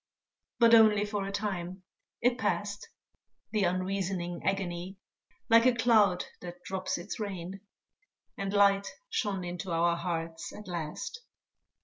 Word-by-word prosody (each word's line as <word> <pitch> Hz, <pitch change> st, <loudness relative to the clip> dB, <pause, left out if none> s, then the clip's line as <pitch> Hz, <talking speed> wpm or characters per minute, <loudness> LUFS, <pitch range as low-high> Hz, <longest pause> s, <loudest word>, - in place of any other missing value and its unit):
But 235 Hz, -1 st, +6 dB
only 215 Hz, -2 st, +7 dB
for 205 Hz, -1 st, -3 dB
a -, -, -4 dB
time; 190 Hz, -3 st, -3 dB, 0.4 s
it 245 Hz, +1 st, +3 dB
passed, 205 Hz, 0 st, -2 dB, 0.6 s
The 210 Hz, -3 st, +2 dB
unreasoning 185 Hz, -1 st, -2 dB
agony, 190 Hz, -1 st, -2 dB, 0.5 s
Like 230 Hz, +2 st, +6 dB
a 250 Hz, -, +4 dB
cloud 220 Hz, -6 st, +4 dB, 0.2 s
that 180 Hz, 0 st, -9 dB
drops 190 Hz, -1 st, -2 dB
its 180 Hz, +7 st, -6 dB
rain; 195 Hz, -2 st, -5 dB, 0.7 s
And 195 Hz, 0 st, -3 dB
light 200 Hz, -1 st, +4 dB, 0.2 s
shone 195 Hz, -4 st, -1 dB
into 175 Hz, +1 st, -5 dB
our 170 Hz, +1 st, +2 dB
hearts 165 Hz, -1 st, -4 dB
at 210 Hz, -1 st, -10 dB
last. 170 Hz, -, -5 dB
195 Hz, 125 wpm, -30 LUFS, 175-205 Hz, 0.7 s, only